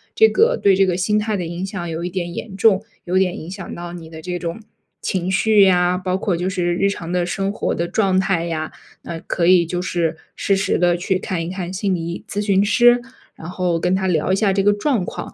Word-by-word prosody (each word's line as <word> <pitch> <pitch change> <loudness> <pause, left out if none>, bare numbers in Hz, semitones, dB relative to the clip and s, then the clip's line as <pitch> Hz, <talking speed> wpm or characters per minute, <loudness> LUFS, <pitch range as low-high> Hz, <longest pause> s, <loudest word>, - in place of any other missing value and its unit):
这 445 - +7
个 - - +3
对 195 -1 +5
这 195 +1 +4
个 180 -2 0
心 200 +3 +1
态 210 0 0
的 180 - -3
影 170 +3 -4
响 185 -3 -5
有 165 +1 -4
一 175 - -2
点 175 -2 -3
严 205 -4 -6
重， 200 0 +3 0.2
有 180 +1 0
点 185 -1 +1
影 160 - -8
响 195 0 -7
到 175 0 -7
你 170 -2 -9
的 160 -1 -10
这 180 +2 -4
种 170 +2 -5 0.4
情 185 0 -2
绪 205 +1 +4
呀， 180 -1 +3
包 185 0 -2
括 190 -2 -1
就 180 +2 -2
是 175 -2 0
日 195 +2 +2
常 170 -3 -6
的 180 -1 +1
生 195 +2 -2
活 - - -2
的 170 - -2
状 190 -1 +1
态 190 -3 0
呀， 160 -2 -3 0.3
那 165 - -6
可 170 +1 -1
以 180 -1 +6
就 175 +2 -3
是 170 -3 -1 0.2
适 195 - +1
时 195 0 0
地 175 0 +3
去 185 +2 0
看 185 -2 -3
一 165 - -5
看 185 -1 -5
心 190 0 0
理 170 - -4
医 170 +1 -5
咨 205 - -3
询 195 -1 +3
师。 240 +3 +5 0.3
然 160 - -10
后 180 -2 -1
跟 180 +2 +1
他 190 0 -1
聊 180 -1 +1
一 - - +4
下 195 -1 +2
这 195 - +2
个 205 +1 +4
状 210 +1 0
况， - - -7
185 Hz, 270 characters per minute, -20 LUFS, 175-195 Hz, 0.4 s, 这